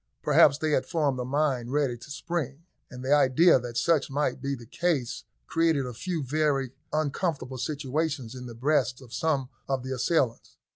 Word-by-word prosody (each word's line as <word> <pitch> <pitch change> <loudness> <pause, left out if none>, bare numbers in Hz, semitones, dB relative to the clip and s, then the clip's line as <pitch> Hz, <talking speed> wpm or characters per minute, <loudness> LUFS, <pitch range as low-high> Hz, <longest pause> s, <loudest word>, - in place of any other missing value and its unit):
Perhaps 140 -1 +6
they 155 0 -1
had 130 -3 +1
formed 145 -6 0
a - - -1
mine 130 -3 0
ready 140 -3 +1
to 120 +4 -13
spring, 150 -1 -4 0.3
and 125 -1 -8
the 135 - +3
idea 145 +3 +5
that 120 -1 -6
such 160 +1 +2
might 145 +2 -1
be 140 0 -1
the 120 -2 -11
case 145 -3 -1 0.2
created 165 - +1
a 125 - -5
few 165 +5 -3
very 140 -2 0 0.2
uncomfortable 150 -3 -1
sensations 145 -2 -2
in 125 -1 -8
the 120 - -9
breasts 130 -1 +1
of 125 -2 -13
some 140 -5 0 0.2
of 135 -2 0
the 130 0 -3
assailants. 130 -2 0
140 Hz, 180 wpm, -27 LUFS, 125-155 Hz, 0.3 s, Perhaps